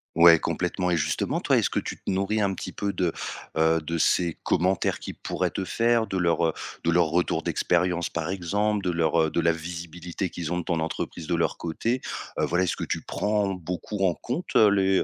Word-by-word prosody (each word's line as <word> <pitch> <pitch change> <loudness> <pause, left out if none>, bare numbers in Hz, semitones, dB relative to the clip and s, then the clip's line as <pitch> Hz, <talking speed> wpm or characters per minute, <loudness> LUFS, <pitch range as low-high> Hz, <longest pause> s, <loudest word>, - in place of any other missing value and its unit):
Ouais 85 0 +8
complètement. 90 +2 -1
Et 85 - +2
justement 75 0 0
toi, - - +3
est-ce - - +1
que - - +1
tu - - -5
te - - -6
nourris 100 +3 0
un 100 -1 +1
petit - - -6
peu 100 -1 -2
de, 90 -2 0 0.5
heu, 80 0 +3
de 85 +2 -3
ces 85 +1 +2
commentaires 90 +1 +1
qui - - -6
pourraient - - -2
te 95 - -4
faire? 115 +3 +2
De 95 - -2
leur 85 -2 +2 0.3
de 85 - +2
leur 85 0 +4
retour 85 +3 +1
d'expérience, 90 -1 +1
par 85 0 -3
exemple, 100 +3 0
de 90 - +1
leur 80 -1 +2
de - - 0
la 85 0 +4
visibilité 85 +2 -5
qu'ils 85 -1 -4
ont 90 - 0
de - - -3
ton 85 -1 -1
entreprise 80 +1 -4
de 85 - -2
leur 85 - 0
côté? 115 +10 -1 0.4
Heu, - - +3
voilà, 90 +1 +1
est-ce 85 - -1
que - - -3
tu - - -2
prends 105 -2 0
beaucoup 90 +3 -3
en 90 - +3
compte 140 - -5
les, 100 -3 +5
90 Hz, 210 wpm, -26 LUFS, 85-95 Hz, 0.5 s, Ouais